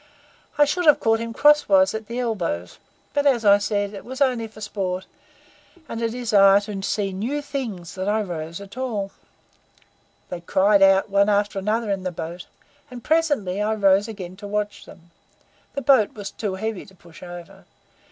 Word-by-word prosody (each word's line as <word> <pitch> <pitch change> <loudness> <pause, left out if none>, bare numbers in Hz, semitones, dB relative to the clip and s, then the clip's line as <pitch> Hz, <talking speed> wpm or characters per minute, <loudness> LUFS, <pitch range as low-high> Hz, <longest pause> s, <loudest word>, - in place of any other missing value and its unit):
I 295 - +6
should 320 +4 -1
have 300 - +7
caught 225 0 +2
him 230 0 -4
cross 295 +3 +4
wise 190 -1 +5
at 220 -1 -5
the 235 +2 -5
elbows; 175 - -3 0.3
but, 285 0 +2
as 240 -5 +2
I 200 0 +7
said, 205 0 -1
it 200 - -8
was 260 +1 -8
only 250 -5 +1
for 215 0 -15
sport 190 -3 -3 0.8
and 230 - -5
desire 220 -4 +4
to 205 -2 -6
see 195 0 -2
new 235 +10 -2
things 235 - -5
that 190 +1 -3
I 215 +1 +1
rose 165 -2 -6
at 200 +3 -12
all. 215 -7 -3 1.2
They 175 - -6
cried 195 +3 +3
out 195 +1 +5
one 200 +1 +3
after 205 -1 +1
another 215 +2 -1
in 195 -1 -1
the 185 -1 -3
boat, 170 +1 -7 0.4
and 245 -2 -10
presently 290 - +1
I 215 +1 0
rose 200 0 +3
again 190 -5 -8
to 205 +1 -8
watch 210 0 -3
them. 170 -2 -16 0.6
The 280 - -3
boat 260 -6 +4
was 205 -2 -6
too 205 -4 -4
heavy 220 0 -4
to 190 - -17
push 170 -2 -17
over. 175 -1 -11
205 Hz, 180 wpm, -23 LUFS, 190-230 Hz, 1.2 s, have